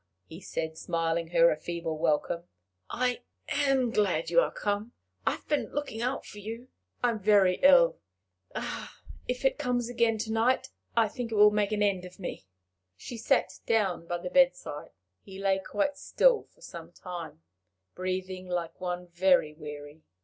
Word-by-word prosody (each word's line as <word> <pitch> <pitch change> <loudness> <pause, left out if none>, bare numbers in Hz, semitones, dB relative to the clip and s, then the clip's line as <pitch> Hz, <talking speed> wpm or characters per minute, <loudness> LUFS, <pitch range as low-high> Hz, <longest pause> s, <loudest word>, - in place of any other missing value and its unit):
he 160 - -11
said, 160 -2 -4
smiling 165 -1 -1
her 170 0 +5
a - - +1
feeble 170 +1 -4
welcome. 155 +2 0 0.4
"I 250 0 0 0.3
am 275 -4 +2
glad 210 - +1
you - - +6
are - - +2
come. 205 +2 -2 0.3
I - - +4
have - - -10
been 295 -1 0
looking 290 -6 -4
out 255 +3 -2
for 210 - -10
you. 230 +5 -7 0.3
I 245 - +4
am 220 - -4
very 195 -3 +4
ill. 270 -2 +6 1.3
If 250 +2 -3
it 265 - +2
comes 245 -1 0
again 235 -2 +2
to 220 +1 -3
night, 250 +4 +2 0.3
I 225 -1 +5
think 230 +2 -5
it - - -1
will 210 0 +7
make 210 0 +1
an 210 -1 +1
end 195 -3 +1
of 180 0 -12
me." 175 - -7 0.5
She 240 - -8
sat 200 -4 +1
down 195 -7 +1
by 175 - -1
the 180 +1 -6
bedside. 260 - +2 0.3
He 190 -1 -11
lay 195 0 +1
quite 210 +9 -1
still - - +3
for - - -28
some - - -9
time, 170 - -8 0.5
breathing 185 0 -4
like 175 -1 -3
one 180 0 -3
very 175 -3 +3
weary. 150 0 -9
200 Hz, 170 wpm, -29 LUFS, 175-240 Hz, 1.3 s, will